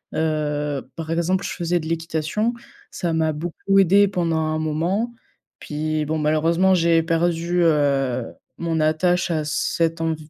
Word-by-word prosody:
Heu, 150 -3 -1
par 160 0 -5
exemple, 175 +3 0
je - - -3
faisais 175 0 -1
de 160 - -7
l'équitation, 165 +7 -1 0.4
ça 170 -2 -2
m'a 160 -1 +1
beaucoup 175 +5 0
aidée 200 +2 +5
pendant 170 -4 -1
un 155 0 -1
moment. 175 +10 -1 0.5
Puis 155 0 -2
bon, 160 +2 -1
malheureusement 165 +5 +2
j'ai 165 -1 +3
perdu, 170 +1 0
heu, 140 -5 +2 0.3
mon 165 -1 -1
attache 170 +4 +1
à 155 -2 0
cet 165 +2 0
env 165 -1 0
165 Hz, 145 wpm, -22 LUFS, 155-175 Hz, 0.5 s, aidée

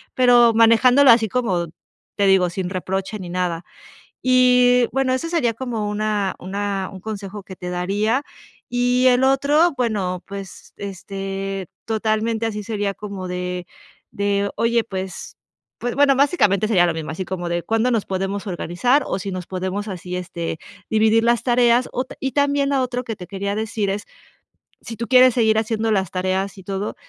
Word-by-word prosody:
pero, 245 -2 +5
manejándolo 240 +4 +6
así 230 -1 +4
como 190 -7 0 0.5
te 200 - +2
digo, 190 -2 +4
sin 180 0 -3
reproche 190 +2 -3
ni 180 -2 -7
nada. 175 -1 -2 0.6
Y 250 -1 +5
bueno, 265 -1 +1
eso 260 +6 -2
sería 310 -9 +1
como 230 -4 -3
una 210 -2 -1
una 195 0 -3
un 190 - -9
consejo 205 -1 -6
que 190 - -10
te 180 0 -7
daría 205 +8 0 0.5
y 245 +1 +2
el 250 0 +4
otro. 285 +5 +3
Bueno, 200 -7 -1
pues, 195 -1 -9
este 195 0 -5 0.2
totalmente 220 +1 -1
así 210 -2 -3
sería 205 -2 -2
como 200 -3 -7
de 180 0 -4 0.5
de: 200 0 0
"Oye", 230 0 +2
pues 190 -3 -6 0.4
pues 245 0 -3
bueno, 285 -1 +5
básicamente 215 - +3
sería 185 -5 +4
lo 170 - 0
mismo, 160 -2 -5
así 170 +4 -4
como 175 -1 -4
de: 170 0 -2
"Cuándo 225 +2 +1
nos 225 -4 0
podemos 195 +2 -3
organizar, 200 - +1
o - - -1
si 195 +1 -5
nos 185 -1 -6
podemos 190 +3 -3
así, 180 -2 -5
este, 170 -2 -5 0.3
dividir 220 +1 +3
las 235 -1 +2
tareas", 240 0 +3
o 255 - -1
y 270 -2 -3
también 285 0 +1
a 270 - +2
otro 250 0 -3
que 225 -3 -4
te 180 -3 -10
quería 200 0 -3
decir 215 -1 -2
es, 200 +1 -2 0.8
si 230 - -8
tú 235 +2 -5
quieres 255 -1 +6
seguir 220 -3 +3
haciendo 225 0 -1
las 190 -4 0
tareas 190 +1 -1
y - - -10
todo 195 +2 -4
210 Hz, 170 wpm, -21 LUFS, 190-245 Hz, 0.8 s, manejándolo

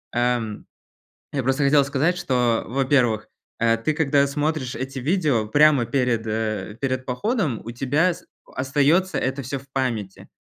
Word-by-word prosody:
ам, 120 -3 -1 0.7
я 140 - 0
просто 135 +3 +1
хотел 140 +1 +5
сказать, 145 +5 +1
что, 125 -7 +1
во-первых, 125 -4 +1 0.3
э, 115 0 +3
ты 115 +7 -1
когда 140 -2 +2
смотришь 145 -2 -2
эти 130 +2 -5
видео 145 - +1
прямо 145 +1 +4
перед, 120 -2 0
э, 110 -1 -3
перед 130 -1 -1
походом, 160 - -1
у 115 - -5
тебя 140 +9 +1
с - - -15 0.2
остается 145 +6 +1
это 135 +1 -1
всё 135 +3 -4
в 135 +1 -19
памяти. 115 -8 -3
135 Hz, 150 wpm, -23 LUFS, 120-145 Hz, 0.7 s, хотел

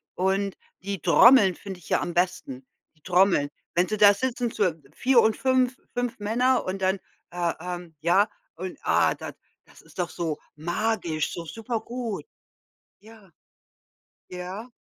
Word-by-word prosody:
Und 190 +1 0 0.3
die 200 -2 -3
Trommeln 225 -8 +6
finde 190 -3 -8
ich - - -15
ja - - +2
am 175 - -3
besten, 175 -8 -1 0.3
die 155 - -31
Trommeln. 180 -5 +3 0.3
Wenn 175 +1 +3
Sie 215 - -2
da 205 0 +8
sitzen, 245 +1 -2
so 200 -3 +2 0.2
4 255 -1 +4
und 220 - +2
5- 260 -1 +1 0.2
5 245 -3 -2
Männer 245 +5 +1
und 190 +1 -4
dann, 190 +1 +1 0.3
äh, 175 -1 -1
ähm, 175 -2 -7
ja, 190 +6 +3 0.3
und, 185 +2 -6
ah, - - +3
da - - -8 0.3
das - - -19
ist - - -20
doch 175 -1 -1
so 160 -3 -3 0.2
magisch, 170 -1 -1
so 170 -1 -6
super 225 +5 -4
gut. 235 -2 -5 0.8
Ja. 215 -4 -17 1.0
Ja. 185 +6 -7
195 Hz, 155 wpm, -26 LUFS, 175-225 Hz, 1.0 s, da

